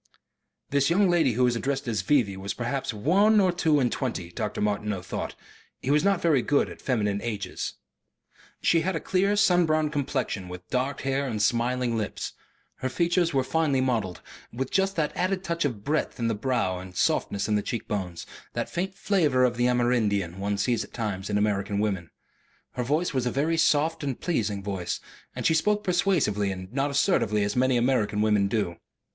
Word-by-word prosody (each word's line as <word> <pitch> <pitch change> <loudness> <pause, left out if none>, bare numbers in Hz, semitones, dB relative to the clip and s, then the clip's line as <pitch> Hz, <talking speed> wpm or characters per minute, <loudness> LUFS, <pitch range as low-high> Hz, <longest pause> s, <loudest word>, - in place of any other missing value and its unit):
This 140 +1 +3
young 185 +2 +4
lady 160 -8 +3
who 125 +3 +1
was 125 -1 +3
addressed 135 +2 -2
as 110 -4 0
"V.V." 105 -3 +2
was 95 +1 -4
perhaps 125 +3 -2
one 195 - +3
or 185 -2 +4
two 160 -4 +2
and 125 -3 +1
twenty, 105 -10 -3
Dr. 105 +3 -3
Martineau 105 -2 -1
thought, - - -5 0.4
he 135 - -1
was 150 +1 +3
not 200 -2 +2
very 155 -6 +4
good 145 +3 +2
at - - -11
feminine 105 -5 0
ages. 100 -5 -4 0.9
She 165 - +4
had 190 +1 -1
a - - 0
clear 195 +4 +1
sun 180 -4 +4
browned 155 -1 +1
complexion, 130 -9 -2
with 90 0 -9
dark 130 +2 -1
hair 135 +1 0
and 110 -4 -3
smiling 120 +2 +1
lips. 110 -2 -3 0.4
Her 130 - -2
features 170 +4 +1
were 135 -2 +1
finely 150 -1 +1
modelled, 115 -8 -1 0.3
with 130 +2 -4
just 195 0 +1
that 155 -3 -1
added 185 +1 0
touch 170 -3 -1
of 115 -8 -3
breadth 150 +4 -1
in 115 -2 -1
the 115 - +1
brow 110 -5 -1
and 90 0 -10
softness 100 +2 0
in 110 - 0
the 105 - +2
cheek 115 +2 -4
bones, 90 -5 -4 0.3
that - - -3
faint 190 +2 -2
flavour 160 -11 +2
of 125 -1 +2
the 120 +1 +2
Amerindian, 110 -8 +1
one 100 +1 -1
sees 120 +3 +1
at - - -14
times 100 -4 -3
in 105 - +1
American 105 -1 0
women. 100 -6 -1 0.6
Her 125 - -3
voice 150 +7 0
was 130 -2 0
a - - 0
very 155 +5 +1
soft 160 +1 +2
and 135 -4 -3
pleasing 105 - -1
voice, 95 -4 -3 0.4
and - - -4
she - - +4
spoke 210 +6 +2
persuasively 170 - +1
and 95 +2 -7
not 140 +2 0
assertively 125 - +2
as 100 - -1
so - - 0
many 130 -1 +3
American 115 -5 +1
women 105 -2 +3
do. 100 -5 -1
125 Hz, 195 wpm, -26 LUFS, 105-155 Hz, 0.9 s, young